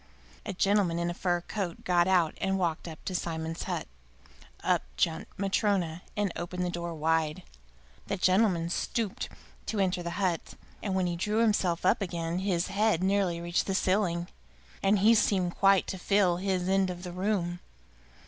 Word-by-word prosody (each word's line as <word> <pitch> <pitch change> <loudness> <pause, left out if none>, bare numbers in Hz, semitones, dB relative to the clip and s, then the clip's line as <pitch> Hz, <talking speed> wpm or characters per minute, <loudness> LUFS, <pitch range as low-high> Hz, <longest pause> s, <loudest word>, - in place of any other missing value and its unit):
A 205 - -2
gentleman 195 -2 +2
in 170 0 0
a - - -4
fur 175 0 0
coat 185 -2 -4
got 175 -1 +3
out 180 -4 +3
and 195 0 +1
walked 170 -3 -1
up 160 -2 -9
to 185 - -3
Simon's 165 -2 -3
hut. - - -3 0.8
Up - - +2 0.2
jumped 160 -1 0
Matryona 195 -4 0 0.2
and 205 -3 +1
opened 180 +1 -3
the 175 - -1
door 170 -1 -4
wide. 160 +2 0 0.6
The 200 - -1
gentleman 185 -3 +2
stooped 215 +2 -2 0.4
to 220 - -2
enter 185 -2 +1
the 170 - -3
hut, 180 -5 -1 0.3
and 195 -3 -2
when 185 -1 +2
he 175 -1 -1
drew 210 +5 -1
himself 200 -7 +2
up 185 - +3
again 170 -2 -2
his 185 -3 0
head 205 -3 +2
nearly 190 -3 +1
reached 170 +1 -1
the 195 - 0
ceiling, 185 -3 +1 0.5
and 200 +2 +4
he 210 +4 +6
seemed 190 -5 +2
quite 195 -1 +4
to 190 - -5
fill 190 -2 +3
his 185 -1 -1
end 190 0 +2
of 180 0 -6
the 180 - -5
room. 180 -2 -1
180 Hz, 175 wpm, -29 LUFS, 170-195 Hz, 0.8 s, he